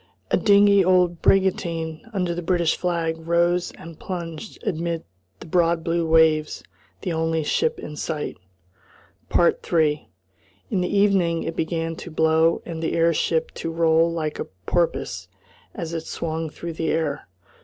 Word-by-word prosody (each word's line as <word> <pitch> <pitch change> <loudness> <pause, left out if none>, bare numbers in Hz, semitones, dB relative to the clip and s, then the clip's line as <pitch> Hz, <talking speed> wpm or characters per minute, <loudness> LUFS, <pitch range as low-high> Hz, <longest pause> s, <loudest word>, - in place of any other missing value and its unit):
A - - +5
dingy 200 -1 +5
old 180 -2 +3
brigantine 170 -2 +1
under 180 -5 -1
the 175 - -4
British 175 -1 +1
flag 170 -2 -1
rose 170 +2 +1
and 165 -1 -12
plunged 170 +1 -6
amid 170 0 -2 0.4
the - - -8
broad 170 0 +2
blue 165 0 0
waves 160 -1 +3 0.4
the 180 -4 -2
only 160 0 0
ship 470 - 0
in 150 - -8
sight. 150 0 -3 1.0
3 155 -3 +2 0.6
In 185 - +1
the 180 - -1
evening 195 -5 +2
it 165 - -4
began 165 0 -2
to - - -8
blow 160 +1 +2
and 165 -2 -6
the 160 - -1
air 165 0 +3
ship 160 +1 0
to 165 - -5
roll 165 0 +3
like 155 -2 -3
a - - -2 0.2
porpoise 170 -2 -1 0.5
as 170 -5 -5
it 165 -1 -4
swung 160 -1 -3
through 170 +2 -7
the 160 0 -2
air. 155 -3 -1
165 Hz, 150 wpm, -23 LUFS, 160-175 Hz, 1.0 s, A